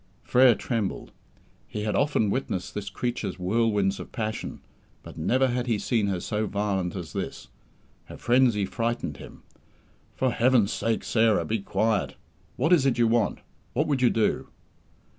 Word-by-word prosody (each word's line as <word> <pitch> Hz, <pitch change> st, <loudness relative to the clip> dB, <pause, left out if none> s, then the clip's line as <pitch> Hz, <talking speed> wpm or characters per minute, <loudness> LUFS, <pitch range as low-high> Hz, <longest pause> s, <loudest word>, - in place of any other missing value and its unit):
Frere 125 Hz, -2 st, +5 dB
trembled. 110 Hz, -5 st, -3 dB, 0.6 s
He 105 Hz, -, -5 dB
had 105 Hz, -, -1 dB
often 140 Hz, -8 st, +2 dB
witnessed 95 Hz, -8 st, -3 dB
this 100 Hz, -1 st, -4 dB
creature's 110 Hz, -3 st, -3 dB
whirlwinds 100 Hz, 0 st, +1 dB
of -, -, -8 dB
passion, 110 Hz, -3 st, -4 dB, 0.4 s
but -, -, -11 dB
never 130 Hz, +11 st, +2 dB
had 125 Hz, 0 st, -2 dB
he 115 Hz, -3 st, +1 dB
seen 110 Hz, 0 st, 0 dB
her 95 Hz, -3 st, -1 dB
so 105 Hz, +3 st, -2 dB
violent 100 Hz, -3 st, -1 dB
as 90 Hz, -4 st, -6 dB
this. -, -, -5 dB, 0.6 s
Her -, -, -10 dB
frenzy 120 Hz, -5 st, +3 dB
frightened 115 Hz, -, -2 dB
him. -, -, -12 dB, 0.7 s
"For 130 Hz, -1 st, +1 dB
Heaven's 120 Hz, -3 st, +3 dB
sake, 115 Hz, -1 st, -1 dB
Sarah, 110 Hz, -2 st, +2 dB
be 110 Hz, 0 st, -1 dB
quiet. 105 Hz, +2 st, 0 dB, 0.4 s
What 160 Hz, -, +2 dB
is 145 Hz, -6 st, +4 dB
it 130 Hz, -, +1 dB
you 120 Hz, -1 st, +4 dB
want? 115 Hz, -2 st, +1 dB, 0.3 s
What 150 Hz, +5 st, +1 dB
would 140 Hz, -4 st, 0 dB
you 125 Hz, -, +5 dB
do?" 110 Hz, -2 st, 0 dB
115 Hz, 160 wpm, -26 LUFS, 100-125 Hz, 0.7 s, Frere